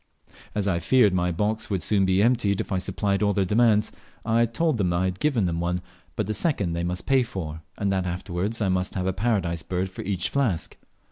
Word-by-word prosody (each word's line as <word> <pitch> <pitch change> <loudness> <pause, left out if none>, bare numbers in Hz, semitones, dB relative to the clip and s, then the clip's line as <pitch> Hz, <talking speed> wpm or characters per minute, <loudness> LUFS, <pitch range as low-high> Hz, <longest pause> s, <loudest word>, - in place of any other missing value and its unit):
As 105 -1 0
I 90 -3 +1
feared 110 +1 +4
my 90 -1 +1
box 105 +6 -1
would 95 -4 -1
very - - 0
soon 100 -3 +3
be 95 +1 +3
emptied 115 -5 +2
if - - -4
I 95 - +1
supplied 100 +1 -1
all 105 -1 +3
their 100 -2 +1
demands, 105 +1 +3 0.3
I 115 +1 +3
told 140 +3 0
them 90 -3 +1
I 85 +1 +1
had 95 0 -2
given 130 -10 +1
them 85 -1 -1
one, 90 +1 -1 0.4
but 105 - -1
the 110 - -2
second 105 - 0
they 85 0 -2
must 90 +1 -3
pay 135 -1 +4
for, 80 -10 -5 0.2
and 100 -2 0
that 95 -1 0
afterwards 90 +5 -3
I 95 - +1
must 95 0 -1
have 90 -2 -1
a 95 - 0
Paradise 95 -5 0
bird 95 +2 -3
for - - -7
each 95 -2 -1
flask. 120 -12 -1
95 Hz, 230 wpm, -25 LUFS, 90-110 Hz, 0.4 s, feared